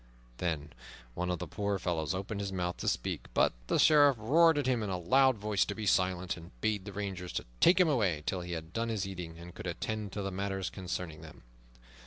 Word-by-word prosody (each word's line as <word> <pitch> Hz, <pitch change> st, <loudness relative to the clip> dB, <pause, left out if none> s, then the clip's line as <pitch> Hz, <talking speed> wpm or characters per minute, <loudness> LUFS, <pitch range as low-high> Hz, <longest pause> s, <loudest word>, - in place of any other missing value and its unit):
Then 75 Hz, -4 st, -2 dB, 0.4 s
one 90 Hz, +5 st, -2 dB
of 90 Hz, -, 0 dB
the -, -, -5 dB
poor 100 Hz, -1 st, -2 dB
fellows 85 Hz, -2 st, -1 dB
opened 100 Hz, +2 st, -4 dB
his 100 Hz, -1 st, -3 dB
mouth 90 Hz, -2 st, -2 dB
to -, -, -5 dB
speak, -, -, -1 dB
but -, -, +4 dB
the -, -, +2 dB
Sheriff 145 Hz, -4 st, +6 dB
roared 160 Hz, +8 st, +5 dB
at 145 Hz, -, 0 dB
him 125 Hz, -3 st, +1 dB
in 105 Hz, -, -2 dB
a 95 Hz, -, -1 dB
loud 130 Hz, +8 st, +4 dB
voice 105 Hz, -1 st, +1 dB
to 100 Hz, -, -4 dB
be 110 Hz, -, -4 dB
silent, 90 Hz, -2 st, +1 dB
and 80 Hz, -8 st, -13 dB
bade 105 Hz, -, 0 dB
the 100 Hz, -, -6 dB
rangers 95 Hz, -2 st, -4 dB
to -, -, -3 dB
take 180 Hz, -, +6 dB
them 180 Hz, -2 st, +5 dB
away 100 Hz, -, +1 dB
till 95 Hz, -, -1 dB
he 85 Hz, 0 st, -5 dB
had 80 Hz, 0 st, -6 dB
done 115 Hz, 0 st, -1 dB
his 110 Hz, -4 st, -1 dB
eating 90 Hz, -4 st, -6 dB
and 85 Hz, +1 st, -10 dB
could -, -, -7 dB
attend 105 Hz, +4 st, -3 dB
to 100 Hz, -, -3 dB
the 95 Hz, -, -3 dB
matters 95 Hz, 0 st, -2 dB
concerning 90 Hz, -4 st, -5 dB
them. 80 Hz, -5 st, -13 dB
95 Hz, 230 wpm, -31 LUFS, 90-110 Hz, 0.4 s, Sheriff